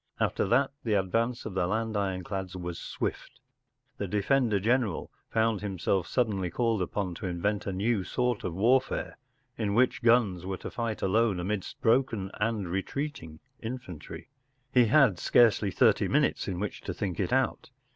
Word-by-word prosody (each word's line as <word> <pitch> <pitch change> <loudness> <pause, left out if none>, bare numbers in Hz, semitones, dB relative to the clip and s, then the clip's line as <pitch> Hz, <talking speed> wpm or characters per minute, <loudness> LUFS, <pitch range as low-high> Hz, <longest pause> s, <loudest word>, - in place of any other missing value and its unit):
After - - +1
that 130 +6 +3
the 110 -3 +1
advance 115 +6 0
of 110 - -5
the 90 -2 0
land 110 +2 -1
ironclads 95 -1 -3
was 90 -2 -5
swift.: - - -5 0.6
The 100 - -2
defender 105 +2 +2
general 115 -3 0 0.2
found 110 -2 +1
himself 95 -3 -1
suddenly 100 -4 0
called 115 0 0
upon 90 0 -2
to 95 - -5
invent 100 +4 -1
a - - 0
new 100 +2 0
sort 125 +2 -1
of 85 -2 -3
warfare, 125 +7 +1 0.4
in 105 -2 0
which 125 +1 +3
guns 115 -7 +3
were 95 0 -3
to - - -7
fight 115 -3 -3
alone 105 0 +2
amidst 95 +2 -3
broken 115 -5 +2
and 105 -3 0
retreating 95 - -4 0.2
infantry. 115 - -7 0.4
He 125 -2 +6
had 115 - +4
scarcely 110 -4 +4
thirty - - +3
minutes - - +1
in 90 -2 -3
which 105 +1 -4
to - - -5
think 95 -4 -3
it 95 - -1
out. 130 +4 0
105 Hz, 160 wpm, -29 LUFS, 95-120 Hz, 0.6 s, He